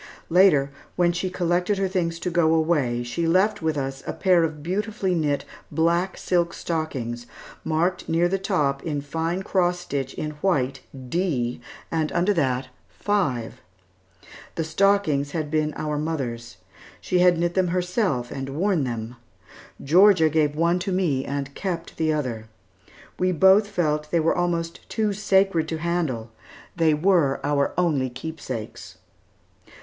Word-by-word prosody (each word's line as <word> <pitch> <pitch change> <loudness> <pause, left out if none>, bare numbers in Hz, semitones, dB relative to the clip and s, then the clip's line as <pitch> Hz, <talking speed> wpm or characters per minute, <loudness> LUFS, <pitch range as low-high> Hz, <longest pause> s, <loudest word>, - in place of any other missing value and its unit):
Later, 165 -7 +5 0.2
when 175 -1 +3
she 175 +2 -2
collected 180 +2 0
her 195 0 +1
things 175 -3 -1
to 180 - -2
go 165 -1 +3
away, 145 -7 +1
she 120 +8 -2
left 190 +5 +2
with 160 -2 0
us 135 -1 -3
a - - -2
pair 180 -3 +3
of 155 -2 -3
beautifully 195 +1 -1
knit 150 -4 0 0.3
black 170 +3 +1
silk 175 -2 0
stockings, 125 -8 -4 0.4
marked 170 +3 -1
near 165 +2 +3
the 195 +2 -1
top 150 -8 0
in 150 -3 -3
fine 165 +5 -2
cross 180 -2 +1
stitch 140 -7 -4
in 155 - -3
white, 135 -8 +1 0.3
"D," 130 -6 -1 0.3
and 160 -2 0
under 180 +4 +2
that 130 -7 0 0.2
"5." 145 - -2 0.9
The 165 - -1
stockings 160 -4 +1
had 155 -3 -3
been 155 -1 +1
our 150 -1 -2
mother's. 120 - -4 0.4
She 180 - 0
had 180 -1 +5
knit 170 +1 0
them 185 -1 +2
herself 180 - -1
and 135 0 -5
worn 180 -5 +1
them. 120 0 -5 0.7
Georgia 180 +2 +5
gave 150 -1 +1
one 170 +3 +2
to 185 +2 -3
me 165 -8 0
and 140 0 -4
kept 175 -2 -4
the 160 -1 +1
other. 125 -8 -3 0.7
We 185 0 +2
both 190 +5 +5
felt 155 -6 0
that 150 - -24
they 170 - +3
were 160 +1 +2
almost 170 -1 -2
too 215 -2 0
sacred 190 -5 +2
to 160 - -3
handle. 155 -9 -2 0.4
They 160 -3 +3
were 160 -4 +2
our 145 -1 0
only 150 -8 +1
keepsakes. 130 -5 -7
165 Hz, 150 wpm, -24 LUFS, 145-180 Hz, 0.9 s, Later